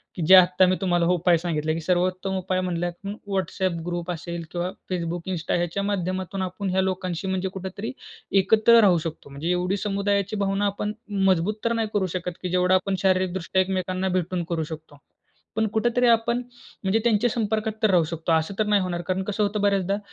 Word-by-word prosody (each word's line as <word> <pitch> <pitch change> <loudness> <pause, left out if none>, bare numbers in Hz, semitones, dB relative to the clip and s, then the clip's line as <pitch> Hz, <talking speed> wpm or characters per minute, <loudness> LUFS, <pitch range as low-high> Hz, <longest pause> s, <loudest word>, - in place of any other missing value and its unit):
की - - -4
जे 190 - +10
आत्ता 185 0 +6
मी 185 0 +2
तुम्हाला 175 -2 +2
उपाय 175 -1 +3
सांगितले 155 -2 -1
की 165 - -3
सर्वोत्तम 185 +2 0
उपाय 185 0 -1
म्हणलंत 175 +1 -3
म 200 - -3 0.2
WhatsApp 185 -1 -1
ग्रुप 175 0 -3
असेल 170 0 -5
किंवा 175 +1 -2 0.2
Facebook, 175 0 -3
Insta 170 -1 -1
ह्याच्या 175 +3 -1
माध्यमातून 190 -1 -2
आपण 190 +2 -3
ह्या 190 +1 +2
लोकांशी 185 -1 -2
म्हणजे 190 0 -1
कुठेतरी 190 +3 -5 0.5
एकत्र 220 +4 +5
राहू 185 -4 +5
शकतो. 160 -3 -6
म्हणजे 145 +5 -3
एवढी 180 +2 0
समुदायाची 200 0 -1
भावना 195 +1 0
आपण 205 +1 -2 0.4
मजबूत 185 +4 +1
तर 230 - +2
नाही 225 -1 0
करू 200 -2 +1
शकत 180 0 -4
की 180 - -3
जेवढं 180 +1 +2
आपण 190 +1 0
शारीरिकदृष्ट्या 185 -1 +1
एकमेकांना 185 0 -1
भेटून 180 -1 -1
करू 165 -2 -1
शकतो. 155 -1 -9 0.6
पण 220 - +2
कुठेतरी 240 +2 +2
आपण 235 +1 +3 0.5
म्हणजे 195 +4 +2
त्यांच्या 235 0 +3
संपर्कात 220 -1 -1
तर 215 - +5
राहू 175 -3 +4
शकतो, 165 +1 -3
असं 160 +4 +1
तर 215 - +3
नाही 205 -2 +3
होणार 175 -2 -2
कारण 185 0 0
कसं 210 +1 -1
होतं 205 0 -1
बऱ्याचदा 200 -1 +1
185 Hz, 190 wpm, -24 LUFS, 175-200 Hz, 0.6 s, जे